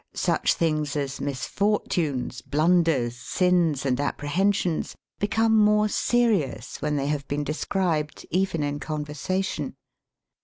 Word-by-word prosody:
Such - - +1
things 155 -3 0
as 140 -2 -3
misfortunes, 145 - -1
blunders, 155 -4 +2
sins, 170 0 +1
and 130 -1 +1
apprehensions 175 +5 0 0.2
become 220 +2 +2
more 210 0 +4
serious 200 - 0
when 150 0 0
they 140 -1 0
have 145 -1 -2
been 145 +1 -1
de 150 - -2
scribed 160 -4 -1
even 180 -3 +1
in 145 0 -2
conversation. 150 +1 -3
155 Hz, 115 wpm, -25 LUFS, 145-190 Hz, 0.2 s, more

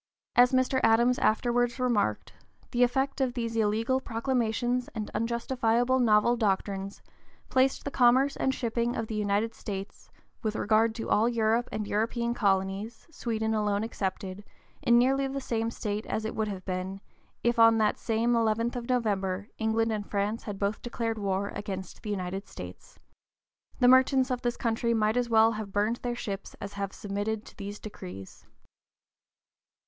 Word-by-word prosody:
As 245 0 +6
Mr. 260 0 +2
Adams 235 +3 +4
afterwards 240 +2 +1
remarked, 225 - 0 0.4
the 245 - 0
effect 270 +3 +1
of 255 -2 0
these 230 -2 -3
illegal 225 +4 +1
proclamations 245 0 -1
and 215 -1 -4
unjustifiable 235 +1 +1
novel 230 0 +4
doctrines 200 -2 -2 0.5
"placed 260 +1 +2
the 280 - -3
commerce 260 +3 +4
and 265 - +1
shipping 235 -2 -1
of 225 - -2
the 220 - -6
United 210 +2 0
States, 195 -2 -7 0.3
with 215 -2 -2
regard 220 +1 +2
to 225 - -4
all 225 +3 +4
Europe 230 +1 +1
and 215 -1 -3
European 230 +3 -1
colonies 200 +1 -1
(Sweden 220 -6 -2
alone 210 -1 0
excepted), 190 -2 -4 0.4
in 235 0 +5
nearly 270 +3 +3
the 275 +1 -3
same 230 -3 -1
state 210 -2 -4
as 220 - -2
it 220 - -3
would 220 -1 -1
have 190 -3 -6
been, 185 +1 -3 0.4
if, 235 0 +2
on 225 0 +7
that 215 -1 +1
same 230 +1 +1
11th 230 +1 +1
of 240 0 -5
November, 205 -5 0
England 225 0 +1
and 210 -2 -3
France 205 +2 -1
had 205 -2 -5
both 200 +2 -1
declared 230 -2 -3
war 200 0 -1
against 190 -3 -6
the 215 - -6
United 190 -1 -3
States." - - -10 0.8
The 250 - +5
merchants 260 +1 +5
of 250 -1 -1
this 240 -1 -1
country 230 0 0
might 215 0 +2
as 245 -1 0
well 225 0 +5
have 215 -2 -5
burned 210 +4 +1
their 245 -1 -3
ships 200 -4 -6
as 200 - -7
have 200 -1 -3
submitted 205 +2 -3
to - - -14
these 205 0 -6
decrees. 95 - -10
225 Hz, 165 wpm, -28 LUFS, 205-240 Hz, 0.8 s, on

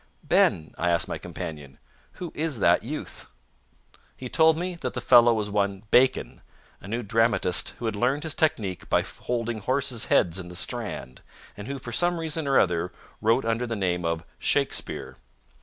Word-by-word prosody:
"Ben," 80 -1 +2
I 90 - +1
asked 85 -1 +1
my - - -4
companion, 75 -4 -8 0.4
"who 175 -3 -7
is 155 -4 -1
that 100 - +4
youth?" - - -7 0.9
He 125 - -7
told 160 +2 +4
me 180 +2 -3
that 125 - -4
the - - -1
fellow 120 0 +6
was 105 -2 -1
one 100 -1 -1
Bacon, 130 +1 +3 0.4
a - - -11
new 115 +4 -3
dramatist 115 -4 +2
who 120 - -6
had 110 -2 -1
learned 130 +7 0
his 160 -2 0
technique 110 - -1
by - - +3
holding 120 -2 -4
horses' 130 +1 -1
heads 85 +1 +2
in 90 - -7
the 90 - -8
Strand, 100 - -2 0.3
and 100 - -8
who, 140 0 -4
for 120 -2 -8
some 175 +7 +1
reason 160 -2 -3
or 135 - +3
other, 90 0 +1 0.3
wrote 115 +3 +2
under 115 +2 0
the 115 - -3
name 90 -3 -1
of 85 0 -2
Shakespeare. - - -1
115 Hz, 175 wpm, -26 LUFS, 95-135 Hz, 0.9 s, fellow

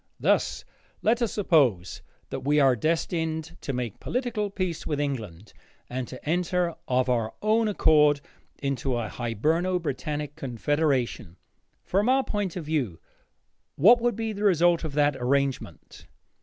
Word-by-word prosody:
Thus - - +1 0.4
let 235 +3 +2
us 235 - +1
suppose 135 - +2 0.3
that - - -3
we 145 +2 +2
are 135 -3 +5
destined 160 +2 -1
to - - -3
make 125 -5 -4
political 240 -5 -2
peace 185 -4 -3
with 150 -2 -1
England 110 - -4 0.4
and 125 -1 -3
to 130 - -10
enter 175 +1 0
of 130 0 +1
our 115 -3 0
own 220 +1 +3
accord 150 -7 +4 0.4
into 135 -2 -1
a 115 -3 -3
Hiberno 160 - 0
Britannic 150 -1 -4
confederation. 130 - -1 0.5
From 205 +6 +1
our 265 +1 +4
point 205 -7 -3
of 175 -4 -5
view, 135 - -2 0.8
what 230 - +6
would 240 0 +1
be 225 -1 -3
the 205 0 -5
result 175 -3 +3
of 155 -3 -4
that 145 -1 +2
arrangement? 135 +1 -2
150 Hz, 140 wpm, -26 LUFS, 130-185 Hz, 0.8 s, what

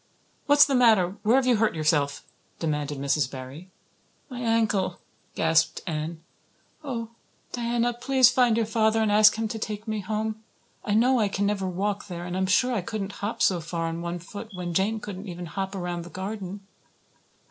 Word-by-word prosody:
"What's 290 0 +7
the 280 - -1
matter? 220 -7 +4
Where 220 +3 +3
have 265 -1 +3
you 250 -3 +4
hurt 215 -4 +1
yourself?" 150 -3 +1 0.3
demanded 150 -3 -2
Mrs. 140 -1 0
Barry. 135 +7 -9 0.6
"My 250 - -6
ankle," 220 -6 +1 0.4
gasped 160 0 +2
Anne. 160 0 -4 0.6
"Oh, 235 -5 -4 0.4
Diana, 240 0 0
please 255 +1 +4
find 245 -3 +3
your 230 - +2
father 220 0 +2
and 220 -2 +2
ask 210 0 +6
him 225 0 -1
to 220 - -4
take 215 0 -5
me 215 -1 -2
home. 215 +2 -3 0.4
I 205 - 0
know 250 +3 +4
I 215 - +3
can 200 0 -1
never 200 -2 0
walk 200 +3 -2
there. 175 -2 -6
And 180 0 -4
I'm 190 0 0
sure 250 +6 +3
I 220 - 0
couldn't 200 0 -4
hop 205 +3 -1
so 180 -3 +3
far 165 +1 -3
on 165 +1 -3
one 170 0 -3
foot 200 +5 -9
when 175 -1 -4
Jane 205 +5 +1
couldn't 205 -1 -7
even 175 0 -6
hop 190 +4 -4
around 175 -2 -3
the 175 - -10
garden." 195 0 -6
205 Hz, 185 wpm, -26 LUFS, 175-225 Hz, 0.6 s, What's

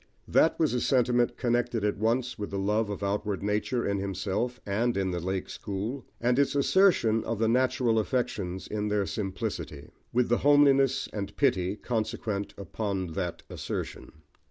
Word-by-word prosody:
That 160 - +4
was 155 -5 +2
a 125 - 0
sentiment 125 -2 +2
connected 120 -2 0
at 105 -1 -1
once 120 +3 0
with 105 - -4
the 100 - -4
love 105 +2 +1
of 100 0 -4
outward 100 0 -1
nature 105 +4 0
in 100 0 0
himself 100 +6 -2
and 110 +3 0
in 95 -1 0
the 90 - -2
"Lake 95 +2 -3
School," 105 +7 -5
and 125 +2 +2
its 140 0 +2
assertion 140 - +4
of 115 - -2
the 110 +1 +1
natural 120 -1 +2
affections 100 -6 -2
in 105 0 -2
their 105 -1 +1
simplicity; 95 -8 -4 0.2
with 125 0 +2
the 120 - +2
homeliness 140 -2 +4
and 100 -2 -5
pity, 95 -9 +2
consequent 110 -2 -3
upon 100 -2 -3
that 90 -2 -3
assertion. - - -5
110 Hz, 160 wpm, -28 LUFS, 100-125 Hz, 0.2 s, That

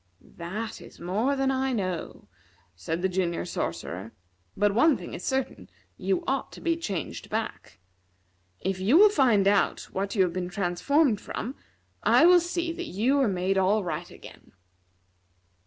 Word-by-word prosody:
"That 210 +7 -5
is - - -14
more 215 +11 0
than 270 0 +1
I 265 0 0
know," 185 -6 -4 0.5
said 160 - -4
the - - +4
Junior 180 -2 -1
Sorcerer. 90 - -4 0.4
"But 205 0 +2
one 270 +6 +4
thing 175 - -9
is 175 - -7
certain 255 - -2 0.3
you 190 - -1
ought 270 0 -1
to - - -10
be 335 -1 0
changed 185 - -5
back. - - -4 0.8
If 190 0 -2
you 215 - +4
will 420 +3 +8
find 235 - +3
out 200 0 +2
what 195 +2 -3
you 195 - +4
have 175 -2 -1
been 180 -1 -3
transformed 205 - +1
from, 250 - -5 0.5
I - - +5
will 355 0 +8
see 345 0 -2
that - - -6
you 245 +9 +1
are 270 - +3
made 190 0 0
all 200 +3 +2
right 170 0 -4
again. - - -14
200 Hz, 160 wpm, -27 LUFS, 180-265 Hz, 0.8 s, will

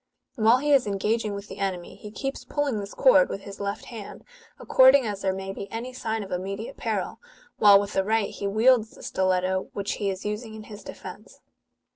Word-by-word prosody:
While 230 0 +4
he 295 +3 0
is 270 -6 +4
engaging 210 +1 -1
with 200 0 -7
the 190 - -10
enemy, 185 -3 -3
he 210 - -10
keeps 270 +6 -5
pulling 285 -7 -1
this 200 0 -7
cord - - +5
with 195 - -5
his 195 0 -10
left 200 +1 -4
hand, 225 -5 -9 0.3
according 260 0 +5
as 205 -2 -4
there 190 - +1
may 190 0 -5
be 195 0 -8
any 240 +3 -5
sign 225 -3 -3
of 195 - -11
immediate 195 +4 -4
peril, 210 -5 -3 0.4
while 205 -1 +8
with 200 0 -4
the 195 - +2
right 220 +1 0
he 200 - -4
wields 225 +2 +4
the - - -15
stiletto, 185 0 0
which 200 0 -3
he 200 - +1
is 190 +1 -5
using 215 +1 -4
in 215 - -9
his 210 -1 -11
defence. - - -10
210 Hz, 205 wpm, -26 LUFS, 195-230 Hz, 0.4 s, while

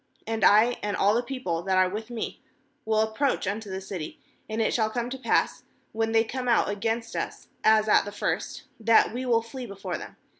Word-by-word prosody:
6And 225 0 -2
I, 220 +4 +6
and 205 -1 -2
all 200 +1 +4
the 235 - +2
people 245 -10 -3
that 190 +1 0
are 185 0 +5
with 215 +4 -5
me, 235 -2 -5 0.4
will 220 0 +2
approach 220 +5 0
unto 205 +2 -3
the 190 0 -4
city; 190 -5 -7 0.3
and 220 +1 -3
it 225 - +1
shall 220 -2 +1
come 240 +2 -3
to 265 - -4
pass, 235 - +1 0.3
when 225 0 -1
they 225 0 +4
come 250 +2 -4
out 235 - +3
against 225 +3 -2
us, - - -5
as 220 0 +5
at - - +5
the 205 - -7
first, 205 - -3 0.2
that 225 0 +4
we 255 +1 -3
will 230 -2 +3
flee 245 +2 -7
before 195 -1 -5
them. - - -10
220 Hz, 215 wpm, -26 LUFS, 205-235 Hz, 0.4 s, I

